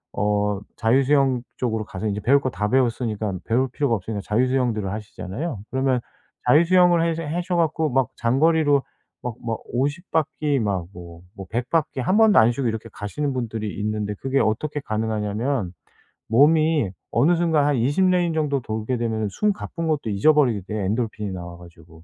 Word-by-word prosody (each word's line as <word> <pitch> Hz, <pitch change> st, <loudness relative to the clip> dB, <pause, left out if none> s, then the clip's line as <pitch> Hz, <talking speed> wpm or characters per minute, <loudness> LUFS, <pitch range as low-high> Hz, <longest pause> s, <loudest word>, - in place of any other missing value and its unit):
어 105 Hz, -1 st, 0 dB, 0.2 s
자유 115 Hz, +4 st, +3 dB
수영 135 Hz, -2 st, +2 dB, 0.2 s
쪽으로 110 Hz, -4 st, -1 dB
가서 95 Hz, +1 st, -6 dB
이제 105 Hz, 0 st, -2 dB
배울 140 Hz, +6 st, +4 dB
거 130 Hz, -, -2 dB
다 105 Hz, -2 st, -2 dB
배웠으니깐 115 Hz, -6 st, 0 dB
배울 125 Hz, +4 st, +1 dB
필요가 140 Hz, -5 st, 0 dB
없으니까 100 Hz, +1 st, -4 dB
자유 115 Hz, +5 st, +1 dB
수영들을 120 Hz, -7 st, 0 dB
하시잖아요. 105 Hz, -, -5 dB
그러면 130 Hz, -1 st, +1 dB, 0.5 s
자유 150 Hz, +6 st, +6 dB
수영을 175 Hz, -1 st, +4 dB
해서 165 Hz, 0 st, -1 dB
해셔 175 Hz, +4 st, -2 dB
갖고 160 Hz, -2 st, +1 dB
막 135 Hz, -1 st, +1 dB
장거리로 145 Hz, +3 st, +3 dB, 0.4 s
막 120 Hz, -3 st, -3 dB
막 115 Hz, -1 st, -2 dB
50 145 Hz, +8 st, -2 dB
바퀴 150 Hz, -3 st, 0 dB
막 100 Hz, -6 st, -1 dB
뭐 85 Hz, -1 st, -11 dB
뭐 95 Hz, -1 st, -9 dB
100 120 Hz, +3 st, -2 dB
바퀴 155 Hz, -5 st, 0 dB
1 185 Hz, +10 st, +1 dB
번도 220 Hz, -2 st, +5 dB
안 110 Hz, +2 st, +5 dB
쉬고 125 Hz, +1 st, -2 dB
이렇게 110 Hz, 0 st, -4 dB
가시는 140 Hz, +7 st, -3 dB
분들이 110 Hz, -4 st, -3 dB
있는데 105 Hz, 0 st, -2 dB
그게 135 Hz, +1 st, 0 dB
어떻게 145 Hz, +7 st, -1 dB
가능하냐면 110 Hz, -1 st, -2 dB, 0.6 s
몸이 150 Hz, -, +4 dB, 0.2 s
어느 170 Hz, +4 st, +3 dB
순간 160 Hz, -4 st, +2 dB
한 145 Hz, -, +2 dB
20 140 Hz, +11 st, +2 dB
레인 175 Hz, -2 st, +2 dB
정도 145 Hz, -3 st, 0 dB
돌게 110 Hz, +2 st, -3 dB
되면은 110 Hz, -2 st, -1 dB
숨 210 Hz, -, 0 dB
가쁜 165 Hz, -4 st, -5 dB
것도 145 Hz, -8 st, -1 dB
잊어버리게 120 Hz, -1 st, +3 dB
돼 105 Hz, -2 st, -3 dB
엔도르핀이 105 Hz, -2 st, -2 dB
나와 85 Hz, -2 st, -7 dB
가지고. 85 Hz, -2 st, -16 dB
120 Hz, 360 characters per minute, -23 LUFS, 105-150 Hz, 0.6 s, 자유